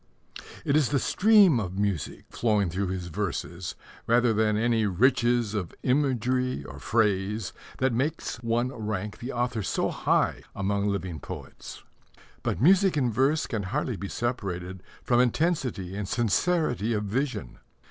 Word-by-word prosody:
It 140 - +2
is 150 -5 +3
the 145 - +2
stream 195 - +5
of 95 -3 -4
music 100 -7 -2
flowing 105 -6 +1
through 95 +3 -1
his 90 -1 -3
verses 90 -2 -4 0.3
rather 120 0 +4
than 105 -1 +2
any 115 -1 +2
riches 120 +2 +2
of 95 -6 -3
imagery 130 - +1
or - - -9
phrase 105 -2 0 0.2
that 130 -1 +1
makes 145 +6 -2
one 115 +1 0
rank 105 -4 -4
the 125 +3 -5
author 120 -2 -1
so 95 - 0
high - - +1
among 100 +1 0
living 95 -5 -2
poets. - - -9 0.6
But - - -2
music 185 - +5
in 125 -4 +2
verse 135 +7 +2
can 110 -5 -3
hardly 120 +5 -2
be 100 0 -6
separated 95 -6 -3 0.2
from 120 -1 +3
intensity 125 - 0
and 100 -1 -3
sincerity 120 - +1
of 105 -1 -1
vision. 115 - -3
115 Hz, 145 wpm, -27 LUFS, 100-130 Hz, 0.6 s, stream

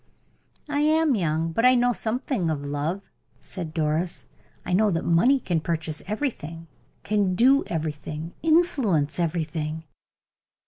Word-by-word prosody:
"I 290 -1 -1
am 310 0 +3
young, 165 -5 0
but 230 - 0
I 255 0 +6
know 245 0 +3
something 225 - -1
of 145 -2 -3
life," 150 +7 -3 0.3
said 175 -5 -6
Doris. 160 +1 -1 0.4
"I 180 - -2
know 210 +3 +4
that 165 -4 -1
money 240 +12 +4
can 175 -9 -1
purchase 160 -2 -3
everything, 190 - -4 0.4
can 200 -3 +1
do 265 +7 +5
everything, 155 0 -4
can 320 0 +4
influence 210 - +1
everything." 160 -1 -2
175 Hz, 135 wpm, -25 LUFS, 160-245 Hz, 0.4 s, I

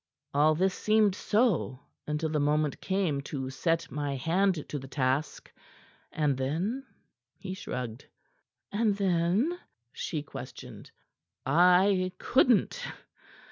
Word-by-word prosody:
All 150 +2 +4
this 190 +3 +2
seemed 215 -1 +3
so 205 - +1 0.3
until 150 +1 -1
the 155 -1 0
moment 150 0 +1
came 185 -7 0
to 135 -3 -4
set 165 +4 -1
my 145 0 -2
hand 170 +4 +1
to 145 - -3
the 135 - -9
task. 135 +2 -1 0.6
And 150 -3 +1
then 180 - -2 0.2
" - - -54
He 185 -2 -6
shrugged. 125 - -6 0.6
"And 210 -1 +1
then?" 195 - +1 0.3
she 150 -3 -3
questioned. 145 - -9 0.6
"I 180 +5 +4
couldn't. 255 - +2
165 Hz, 115 wpm, -29 LUFS, 145-195 Hz, 0.6 s, All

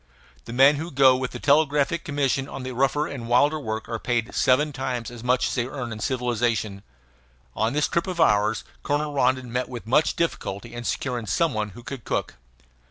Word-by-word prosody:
The - - -8
men 135 +4 +5
who 160 +4 -4
go 135 -3 +5
with 130 0 -2
the - - -7
Telegraphic 150 +2 +2
Commission 140 -2 -1
on 135 - -6
the 130 - -4
rougher 135 +4 +1
and 120 -6 -6
wilder 145 +6 +3
work 110 -5 -4
are 115 -1 -4
paid 120 -1 -1
seven 145 +4 +2
times 125 -3 -3
as 120 -1 -10
much 125 +1 +2
as - - -3
they 120 -1 -1
earn 125 -3 -5
in 110 - -6
civilization. 115 -5 -1 0.7
On 110 +3 0
this 150 +1 +2
trip 170 +2 -1
of 180 -2 -4
ours 105 -7 +3 0.2
Colonel 145 +1 -1
Rondon 130 -2 +1
met 125 +1 -1
with 120 -3 -7
much 130 +7 +2
difficulty 120 -9 -3
in 120 0 -6
securing 120 -3 -2
some 165 +3 +1
one 110 -1 -2
who 120 - -11
could 130 -2 -7
cook. - - -2
130 Hz, 200 wpm, -24 LUFS, 120-145 Hz, 0.7 s, men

